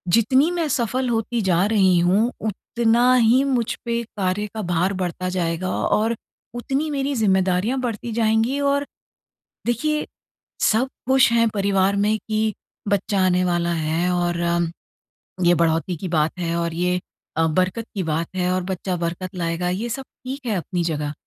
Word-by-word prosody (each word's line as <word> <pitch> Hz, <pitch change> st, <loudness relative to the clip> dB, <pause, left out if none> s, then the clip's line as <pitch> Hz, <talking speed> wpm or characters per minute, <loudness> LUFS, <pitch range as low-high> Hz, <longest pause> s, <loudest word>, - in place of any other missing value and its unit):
जितनी 260 Hz, +8 st, +4 dB
मैं 340 Hz, -3 st, -1 dB
सफल 250 Hz, 0 st, 0 dB
होती 230 Hz, 0 st, -1 dB
जा 185 Hz, -1 st, +2 dB
रही 195 Hz, -4 st, +4 dB
हूँ, 200 Hz, +8 st, +3 dB
उतना 235 Hz, +3 st, +2 dB
ही 245 Hz, +3 st, +4 dB
मुझ 250 Hz, -5 st, 0 dB
पे 235 Hz, 0 st, 0 dB
कार्य 205 Hz, -1 st, -2 dB
का 215 Hz, -, -2 dB
भार 180 Hz, +1 st, 0 dB
बढ़ता 180 Hz, 0 st, -2 dB
जाएगा 180 Hz, 0 st, -1 dB
और 225 Hz, +2 st, +1 dB, 0.4 s
उतनी 275 Hz, +5 st, -1 dB
मेरी 280 Hz, -1 st, -1 dB
ज़िम्मेदारियाँ 190 Hz, +3 st, +2 dB
बढ़ती 235 Hz, -1 st, -3 dB
जाएँगी 225 Hz, +4 st, +2 dB
और 280 Hz, 0 st, +1 dB, 0.8 s
देखिए, 300 Hz, +6 st, 0 dB, 0.5 s
सब 230 Hz, +4 st, +3 dB, 0.2 s
खुश 265 Hz, -2 st, +5 dB
हैं 230 Hz, 0 st, +4 dB
परिवार 195 Hz, -1 st, +2 dB
में 210 Hz, +2 st, +2 dB
कि, 215 Hz, 0 st, +1 dB, 0.3 s
"बच्चा 200 Hz, -1 st, +1 dB
आने 180 Hz, 0 st, +2 dB
वाला 175 Hz, -1 st, 0 dB
है 165 Hz, +2 st, 0 dB
और 175 Hz, -1 st, 0 dB
अम 170 Hz, -1 st, +1 dB, 0.7 s
ये 175 Hz, -, +6 dB
बढ़ोतरी 165 Hz, +2 st, +1 dB
की 185 Hz, -, -5 dB
बात 160 Hz, -2 st, +1 dB
है 170 Hz, -1 st, -1 dB
और 170 Hz, -1 st, -1 dB
ये 180 Hz, +2 st, 0 dB, 0.4 s
अ, 165 Hz, -, +3 dB
बरकत 185 Hz, +7 st, 0 dB
की 195 Hz, -, -1 dB
बात 160 Hz, 0 st, -1 dB
है 180 Hz, 0 st, 0 dB
और 185 Hz, 0 st, 0 dB
बच्चा 185 Hz, 0 st, -3 dB
बरकत 175 Hz, +2 st, -4 dB
लाएगा।" 170 Hz, 0 st, -1 dB
ये 215 Hz, +6 st, -2 dB
सब 270 Hz, +4 st, -4 dB, 0.2 s
ठीक 270 Hz, +1 st, -6 dB
है 220 Hz, -, 0 dB
अपनी 175 Hz, -1 st, -2 dB
जगह, 150 Hz, -3 st, -2 dB
195 Hz, 165 wpm, -22 LUFS, 175-235 Hz, 0.8 s, ये